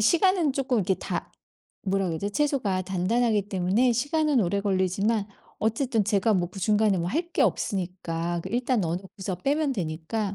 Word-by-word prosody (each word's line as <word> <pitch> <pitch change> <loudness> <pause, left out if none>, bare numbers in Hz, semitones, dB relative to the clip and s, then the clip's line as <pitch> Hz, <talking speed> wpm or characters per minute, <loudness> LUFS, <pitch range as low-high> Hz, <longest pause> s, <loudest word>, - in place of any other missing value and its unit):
시간은 340 - +3
쪼끔 265 -3 0
이렇게 190 -1 +1
다 - - -5 0.5
뭐라 195 -1 0
그러지? 170 +5 -2
채소가 235 -8 0
단단하기 205 +3 +1
때문에 195 +7 +2
시간은 290 +2 +1
오래 200 +1 +1
걸리지만 200 +2 +1 0.3
어쨌든 225 0 +1
제가 210 +1 +2
뭐 175 -2 +1
그 195 - -8
중간에 210 -1 +3
뭐 170 - -1
할 335 - -2
게 - - -1
없으니까 175 -4 -1
그 - - -6
일단 245 0 +1
넣어 170 -2 -1
놓고서 190 0 -6
빼면 285 - 0
되니까 190 +2 -3
205 Hz, 365 characters per minute, -26 LUFS, 185-245 Hz, 0.5 s, 시간은